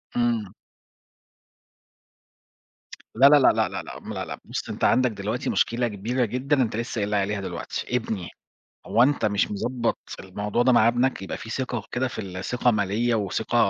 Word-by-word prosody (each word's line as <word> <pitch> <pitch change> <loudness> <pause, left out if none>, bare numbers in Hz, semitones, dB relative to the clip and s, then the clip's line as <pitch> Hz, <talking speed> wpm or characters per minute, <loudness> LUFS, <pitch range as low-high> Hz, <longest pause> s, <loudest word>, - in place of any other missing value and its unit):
إمم. 115 -5 0 2.6
لأ، 135 +4 +7
لأ، 150 - +8
لأ، 135 - +4
لأ، - - -5
لأ، - - -9
م - - -7
لأ، - - -4
لأ، - - -7
بُص، - - -5
أنت - - -5
عندك 125 -2 +4
دلوقتي 105 +4 -3
مشكلة 120 +1 +1
كبيرة 115 +5 -1
جدًا، 130 +4 0
أنت 110 -3 0
لسّه 115 -1 -3
قايل 100 - -1
لي 105 - 0
عليها 100 0 0
دلوقتي، 125 +5 -3
ابني، 105 -6 -4 0.6
هو 115 - +4
أنت 140 -1 +2
مش 100 -2 +1
مضبط 120 +3 -1 0.2
الموضوع 105 +5 -1
ده 130 0 +4
مع 115 -1 +5
ابنك؟ 120 -2 +1
يبقى - - -4
فيه 115 - -9
ثقة 120 -4 -3
كده 130 +1 0
في 95 -5 -6
ثقة 125 +2 +1
مالية 110 +3 +1
وثقة 110 +2 -1
115 Hz, 170 wpm, -25 LUFS, 105-125 Hz, 2.6 s, لأ